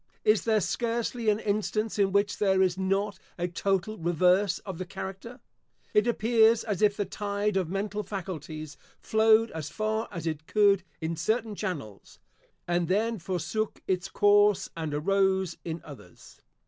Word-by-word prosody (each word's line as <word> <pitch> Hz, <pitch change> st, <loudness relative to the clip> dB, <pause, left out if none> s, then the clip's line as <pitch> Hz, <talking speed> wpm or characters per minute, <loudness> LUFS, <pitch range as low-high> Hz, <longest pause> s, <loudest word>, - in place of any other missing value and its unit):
Is 215 Hz, 0 st, +3 dB
there 220 Hz, -2 st, +3 dB
scarcely 235 Hz, +2 st, -1 dB
an 210 Hz, -, +3 dB
instance 215 Hz, +1 st, -1 dB
in 195 Hz, -1 st, +3 dB
which 200 Hz, 0 st, +1 dB
there 190 Hz, -2 st, +3 dB
is 180 Hz, -2 st, +1 dB
not 195 Hz, +2 st, -1 dB, 0.2 s
a 175 Hz, 0 st, -1 dB
total 195 Hz, +3 st, -1 dB
reverse 180 Hz, +3 st, +2 dB
of 190 Hz, -4 st, -6 dB
the 185 Hz, -, -3 dB
character? 195 Hz, +5 st, -7 dB, 0.5 s
It 210 Hz, +3 st, +4 dB
appears 225 Hz, -1 st, +4 dB
as 210 Hz, -3 st, -3 dB
if 205 Hz, -1 st, +3 dB
the 205 Hz, -, 0 dB
tide 205 Hz, +1 st, -2 dB
of 185 Hz, -4 st, 0 dB
mental 200 Hz, +2 st, -2 dB
faculties 160 Hz, -7 st, -6 dB, 0.2 s
flowed 220 Hz, +1 st, +3 dB
as 155 Hz, -2 st, -5 dB
far 215 Hz, +4 st, -2 dB
as 170 Hz, -4 st, -6 dB
it 160 Hz, -1 st, -3 dB
could 200 Hz, -2 st, +4 dB, 0.2 s
in 160 Hz, +1 st, -2 dB
certain 220 Hz, +7 st, -1 dB
channels, 155 Hz, -, -6 dB, 0.5 s
and 175 Hz, -1 st, +1 dB
then 220 Hz, +4 st, 0 dB
forsook 185 Hz, +5 st, -3 dB
its 185 Hz, 0 st, -1 dB
course, 205 Hz, 0 st, +4 dB
and 160 Hz, -2 st, -3 dB
arose 190 Hz, +3 st, +1 dB
in 165 Hz, 0 st, -5 dB
others. 125 Hz, -, -14 dB
195 Hz, 155 wpm, -28 LUFS, 175-215 Hz, 0.5 s, It